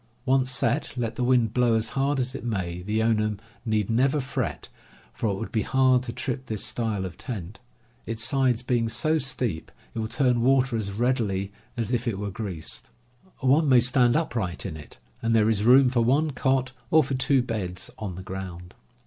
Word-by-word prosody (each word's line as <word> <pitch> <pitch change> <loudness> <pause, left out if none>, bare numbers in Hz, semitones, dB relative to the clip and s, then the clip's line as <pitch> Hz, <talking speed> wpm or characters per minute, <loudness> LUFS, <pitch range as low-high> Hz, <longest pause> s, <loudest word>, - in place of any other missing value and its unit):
Once 130 -1 +2
set, 135 +2 0
let 115 -1 -2
the 125 - -2
wind 120 -3 +3
blow 120 -2 +3
as 110 0 0
hard 140 +1 0
as 130 0 -2
it 135 - -6
may, 90 -7 -3
the 105 +4 -1
owner 110 -2 +1 0.3
need 110 -3 0
never 130 +6 +2
fret, 135 0 -3 0.5
for 115 - -2
it 100 - -1
would 110 +4 -6
be 110 - +1
hard 130 +1 +3
to 125 -2 -4
trip 130 +2 -4
this 110 -2 -2
style 110 -5 -2
of 90 -2 -8
tent. 105 -6 -6 0.5
Its 115 0 -1
sides 130 -3 +1
being 120 -2 0
so 155 +8 +1
steep, 125 - -3 0.2
it - - -4
will 110 - -1
turn 125 -1 +1
water 130 0 +3
as 105 -3 -2
readily 105 -4 0 0.3
as 115 -1 -1
if 120 0 -1
it 110 -4 -1
were 100 0 -4
greased. 95 -6 -3 0.5
One 140 +3 +3
may 130 -2 +7
stand 125 0 +3
upright 115 - -1
in 90 -5 -4
it, 75 -1 -12 0.2
and 115 0 +1
there 110 0 +4
is 105 -1 0
room 130 +1 +6
for 120 -2 +2
one 145 +6 +2
cot 130 -1 0 0.2
or 160 0 +5
for 135 - -4
two 130 0 +2
beds 95 -7 -4
on 100 -5 -5
the 95 - -8
ground." 90 -2 -7
115 Hz, 200 wpm, -26 LUFS, 105-130 Hz, 0.5 s, may